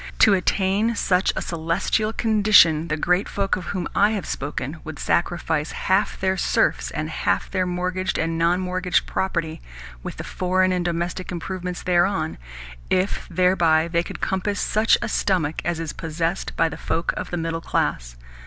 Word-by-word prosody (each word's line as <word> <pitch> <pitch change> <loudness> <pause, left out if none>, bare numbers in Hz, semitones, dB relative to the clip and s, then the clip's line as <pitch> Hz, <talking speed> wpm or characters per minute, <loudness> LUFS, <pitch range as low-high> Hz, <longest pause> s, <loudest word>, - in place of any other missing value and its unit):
To 210 - +6
attain 195 +4 +1
such 185 -2 +2
a - - -2
celestial 170 +6 -1
condition 205 -8 +4
the 155 -1 -1
great 180 +5 +1
folk 195 -1 0
of 185 - -6
whom 185 -3 -3
I 205 +2 +4
have 205 - -3
spoken 140 +1 -4
would 160 -1 -7
sacrifice 165 -3 0
half 190 +2 0
their 190 0 0
serfs - - +1
and - - -3
half - - -1
their 185 -2 0
mortgaged 180 0 -2
and 165 +1 -1
non 170 +2 +2
mortgaged 185 0 0
property, 170 -4 -2 0.4
with - - -7
the - - -5
foreign 185 0 +1
and 180 -1 0
domestic 175 +2 -3
improvements 180 0 -5
thereon, 175 -2 +1 0.5
if 185 +2 0
thereby 170 -3 +3
they 170 0 +1
could - - -8
compass 195 +2 -1
such 215 +1 +3
a - - -1
stomach 165 -6 0
as 170 -1 -1
is 165 -2 -4
possessed 165 +3 -3
by 165 - +3
the 160 - -6
folk 165 - -1
of - - -5
the 175 - -3
middle 165 0 -2
class. - - -1
180 Hz, 170 wpm, -23 LUFS, 165-190 Hz, 0.5 s, To